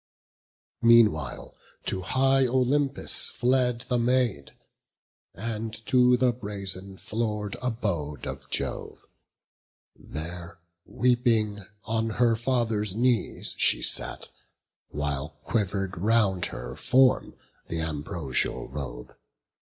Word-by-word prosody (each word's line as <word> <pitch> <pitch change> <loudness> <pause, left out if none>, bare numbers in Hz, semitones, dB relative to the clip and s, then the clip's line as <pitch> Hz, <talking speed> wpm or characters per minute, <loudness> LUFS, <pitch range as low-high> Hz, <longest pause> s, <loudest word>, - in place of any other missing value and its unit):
Meanwhile 110 - +4 0.3
to 95 - -2
high 135 +6 +3
Olympus 130 +3 +2
fled 125 -1 +1
the 125 0 0
Maid, 120 - 0 0.8
And 110 0 -4
to 125 -1 +5
the 125 -1 +3
brazen 100 -4 -5
floor'd 105 -2 -3
abode 95 - -2
of - - -7
Jove. - - -3 0.9
There, 85 +2 -8 0.3
weeping, 115 -5 +1 0.2
on 115 0 -1
her 120 -2 +4
father's 115 -4 0
knees 120 0 0
she - - +4
sat, - - 0 0.6
While 75 +1 -3
quiver'd 95 -4 -1
round 100 -3 +2
her - - -7
form 130 0 +3 0.3
th' - - -4
ambrosial 80 -4 -2
robe. 65 -3 -7
110 Hz, 95 wpm, -27 LUFS, 90-125 Hz, 0.9 s, to